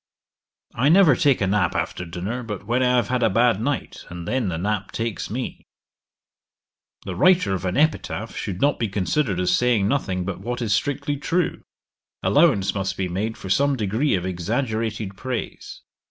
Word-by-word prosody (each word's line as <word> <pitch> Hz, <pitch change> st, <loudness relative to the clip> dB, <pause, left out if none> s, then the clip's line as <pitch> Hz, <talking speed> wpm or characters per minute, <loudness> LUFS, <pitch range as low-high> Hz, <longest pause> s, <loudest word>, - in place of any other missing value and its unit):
'I 130 Hz, +5 st, +2 dB
never 170 Hz, -5 st, +6 dB
take 140 Hz, -2 st, +2 dB
a -, -, +3 dB
nap 95 Hz, -2 st, +1 dB
after 90 Hz, -, -2 dB
dinner 90 Hz, +9 st, -4 dB
but 105 Hz, -4 st, -6 dB
when 120 Hz, +4 st, +1 dB
I 125 Hz, 0 st, +3 dB
have 120 Hz, -4 st, +1 dB
had 125 Hz, -1 st, 0 dB
a 115 Hz, -, +4 dB
bad 115 Hz, -3 st, +3 dB
night, 140 Hz, +3 st, -3 dB
and 85 Hz, -1 st, -7 dB
then 125 Hz, -6 st, 0 dB
the 80 Hz, -, -3 dB
nap 100 Hz, +2 st, -2 dB
takes 115 Hz, -2 st, -3 dB
me.' 125 Hz, +4 st, -5 dB, 1.4 s
'The 95 Hz, -, -4 dB
writer 180 Hz, -, +4 dB
of 95 Hz, -1 st, -3 dB
an 90 Hz, -, -1 dB
epitaph 155 Hz, +2 st, 0 dB
should 95 Hz, -2 st, -4 dB
not 145 Hz, +4 st, +2 dB
be 115 Hz, -, 0 dB
considered 100 Hz, +2 st, 0 dB
as 90 Hz, 0 st, +2 dB
saying 120 Hz, -5 st, +2 dB
nothing 95 Hz, -8 st, -1 dB
but 95 Hz, -1 st, -4 dB
what 120 Hz, +4 st, -3 dB
is 115 Hz, -4 st, 0 dB
strictly 145 Hz, +5 st, -1 dB
true. 175 Hz, +5 st, -1 dB, 0.6 s
Allowance 140 Hz, -, +3 dB
must 95 Hz, -1 st, -2 dB
be 95 Hz, -, -1 dB
made 105 Hz, +5 st, -2 dB
for 95 Hz, -, -6 dB
some 140 Hz, +6 st, +3 dB
degree 110 Hz, +4 st, 0 dB
of 90 Hz, -1 st, -2 dB
exaggerated 110 Hz, +2 st, -2 dB
praise. 130 Hz, +3 st, -5 dB
110 Hz, 180 wpm, -23 LUFS, 95-130 Hz, 1.4 s, never